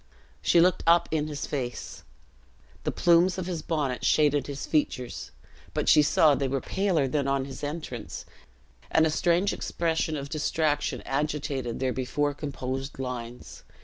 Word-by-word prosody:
She 170 - +4
looked 180 +1 +4
up 170 0 +5
in 155 -1 0
his 145 -2 -4
face. 125 -4 -5 0.8
The - - +1
plumes 175 +1 +4
of 185 - -3
his 175 -3 -3
bonnet 145 -7 -2
shaded 145 -2 +3
his 140 -1 -5
features; 130 -5 -1 0.5
but - - -1
she 150 - +7
saw 150 0 +5
they 140 -1 0
were 135 +1 -1
paler 180 -4 0
than 140 +1 0
on 135 -1 +1
his 135 +1 -9
entrance, 145 -6 -5 0.6
and 160 - +4
a 160 - +1
strange 175 +5 +2
expression 160 -2 -1
of 140 0 -5
distraction 150 -1 0
agitated 140 -3 -2
their 130 -1 0
before 145 +3 -1
composed 135 -1 -5
lines. 125 -2 -6
145 Hz, 150 wpm, -27 LUFS, 135-160 Hz, 0.8 s, she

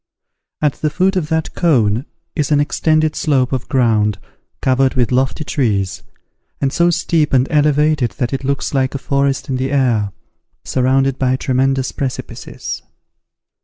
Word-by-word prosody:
At 150 -2 +3
the 155 - +1
foot 185 +6 +1
of 165 -5 -1
that 160 -1 -1
cone 120 - +2 0.3
is 150 -2 -1
an 145 - +4
extended 155 +1 +1
slope 135 -4 +1
of 130 -1 -3
ground, 110 -5 +2 0.4
covered 130 0 +2
with 125 -2 +1
lofty 130 +4 0
trees, 105 -10 -1 0.6
and 135 0 0
so 170 0 +3
steep 160 -3 +1
and 130 -1 +4
elevated 150 -3 +2
that 125 +4 -2
it 135 - -3
looks 140 +2 -2
like 130 0 0
a - - +1
forest 140 0 0
in 130 - -1
the 130 +1 -2
air, 120 -7 +1 0.5
surrounded 135 +1 +1
by 130 -1 +2
tremendous 130 0 0
precipices. 135 -3 -5
135 Hz, 150 wpm, -17 LUFS, 130-150 Hz, 0.6 s, an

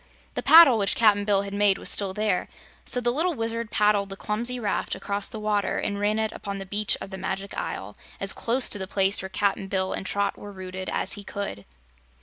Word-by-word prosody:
The - - -2
paddle 310 -8 +8
which 200 -1 +1
Cap'n 205 -3 +3
Bill 200 -1 +2
had 200 0 -7
made 200 -1 +3
was - - -6
still 200 -2 0
there, 210 -1 -1 0.4
so 250 - +3
the 240 -1 0
little 325 +6 0
Wizard 230 -1 -3
paddled 210 -2 +2
the 195 - -6
clumsy 235 +5 0
raft 210 -3 -2
across 200 0 -1
the 220 - -7
water 210 -2 0
and 200 -1 -2
ran 210 +1 +1
it 220 0 -1
upon 200 -2 -6
the 195 - -7
beach 205 +2 +1
of 195 - -8
the 190 - -7
Magic 195 +1 -4
Isle 100 +2 -5 0.2
as 195 0 +2
close 245 +2 +2
to 205 - -1
the 190 - -4
place 195 0 +2
where 190 - -6
Cap'n 195 0 -1
Bill 190 -1 -1
and - - -4
Trot 200 +1 -2
were 205 - -9
rooted 185 -1 -7
as - - -1
he 205 - -7
could. 195 - -6
205 Hz, 225 wpm, -25 LUFS, 195-215 Hz, 0.4 s, paddle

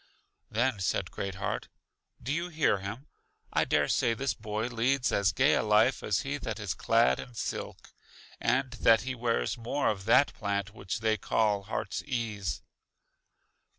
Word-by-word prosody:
Then 120 0 0
said 95 - -1
Great 95 -1 -4
heart: 100 - -3 0.6
Do 135 +4 -1
you 170 +3 -2
hear 155 - +2
him? 105 +8 -6 0.5
I - - +3
dare - - +2
say 115 - +2
this 135 +3 -1
boy 105 0 -3
leads 125 +2 +1
as 100 -1 +3
gay - - +3
a - - +3
life 110 +4 +3
as 105 - 0
he 145 +1 -3
that 110 -4 -4
is 100 -3 -2
clad 115 +2 +3
in 120 - -9
silk, - - -5 0.5
and 130 0 +1
that 115 -1 +6
he 130 +1 -3
wears 115 - -1
more 130 +5 0
of 95 -2 -3
that 125 +5 +5
plant 100 -1 -2
which 100 0 -5
they 110 -1 +2
call 105 -1 +1
heart's 105 -1 -3
ease. 115 -8 -3
115 Hz, 165 wpm, -30 LUFS, 105-125 Hz, 0.6 s, that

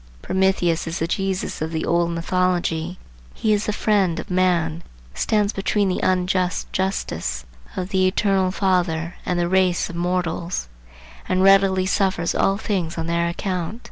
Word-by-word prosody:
Prometheus 185 -3 +1
is 165 +2 -3
the 165 - 0
Jesus 190 +1 -2
of 160 - -1
the 160 -1 -2
old 170 0 +2
mythology. 175 0 -1 0.4
He 215 -1 +1
is 210 0 0
the - - +1
friend 200 -5 +1
of - - -7
man; 175 -3 +1 0.3
stands 210 -1 +1
between 200 0 0
the 180 - -1
unjust 185 0 0
"justice" 80 - -2 0.3
of 185 0 -3
the 190 -2 +2
Eternal 190 -1 +2
Father 180 -3 0
and 180 -1 0
the 175 - +1
race 185 -1 +2
of - - -9
mortals, 175 - -2 0.6
and 185 0 +2
readily 195 -1 +5
suffers 185 -3 +1
all 195 0 +2
things 185 -7 -2
on 165 - -2
their 170 0 0
account. 180 +3 -3
185 Hz, 155 wpm, -22 LUFS, 170-190 Hz, 0.6 s, readily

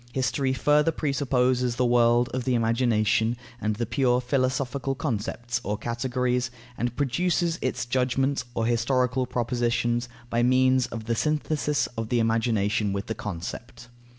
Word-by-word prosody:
History 130 +1 0
further 150 +4 +3
presupposes 130 -5 +1
the 125 - +1
world 120 0 +4
of 130 -1 -2
the 130 0 +1
imagination 115 -1 +2 0.2
and 105 0 0
the 120 +2 -2
pure 125 +1 +2
philosophical 130 +1 -1
concepts 120 -2 -3
or 105 +1 -2
categories, 125 +2 -1 0.3
and 120 +1 -2
produces 170 +5 0
its 120 -2 -2
judgments 130 +2 0
or 115 - 0
historical 125 +2 +1
propositions, 120 0 0 0.2
by 115 - +2
means 130 +1 +3
of 115 -1 -7
the 115 - 0
synthesis 150 +2 0
of 110 -1 -3
the 120 - +1
imagination 110 -2 +1
with 100 +1 -3
the 110 - -3
concept. 120 +6 -7
125 Hz, 140 wpm, -26 LUFS, 115-130 Hz, 0.3 s, world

